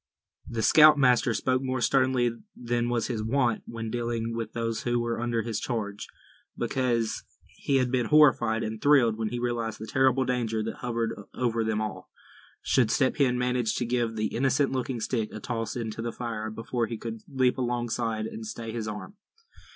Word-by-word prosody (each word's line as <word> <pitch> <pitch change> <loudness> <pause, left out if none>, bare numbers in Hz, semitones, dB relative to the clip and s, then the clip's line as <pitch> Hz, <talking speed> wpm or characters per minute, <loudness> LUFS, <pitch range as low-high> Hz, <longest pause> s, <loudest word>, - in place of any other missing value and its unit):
The 115 -2 -2
scoutmaster 140 -6 +6
spoke 130 +4 +1
more 130 -1 -2
sternly 130 -1 +2 0.2
than 120 0 -1
was 120 -2 0
his 115 -4 -2
wont 120 0 +1
when 115 -1 -5
dealing 115 -1 -2
with 115 -2 -4
those 115 -1 -2
who 120 0 0
were 120 0 -2
under 120 -2 0
his 115 -2 -2
charge; 105 -4 -4 0.5
because 120 -4 0 0.2
he 140 - -3
had 130 -2 +2
been 125 -3 +1
horrified 120 -7 +4
and 110 0 -4
thrilled 135 -6 +5
when 110 -1 -2
he 120 - -4
realized 120 -2 -2
the 110 - -7
terrible 130 +2 +2
danger 115 -3 -1
that 115 - -5
hovered 115 -2 -2 0.2
over 115 -2 0
them 110 -1 0
all, 105 -2 -5 0.5
should 120 -4 +3
Step 130 +1 +2
Hen 125 -3 +3
manage 125 -2 0
to 120 - -1
give 120 -1 0
the 110 0 -2
innocent 135 +3 +2
looking 130 -2 -2
stick 110 0 -1
a - - -7
toss 115 -3 -3
into 115 -2 -4
the 115 0 -3
fire, 110 -2 -4
before 115 +1 -2
he 115 - -5
could 225 - -6
leap 130 -1 +2
alongside, 120 -2 -1
and 110 0 -6
stay 115 +1 -6
his 110 -1 -4
arm. 105 - -7
120 Hz, 180 wpm, -27 LUFS, 115-125 Hz, 0.5 s, scoutmaster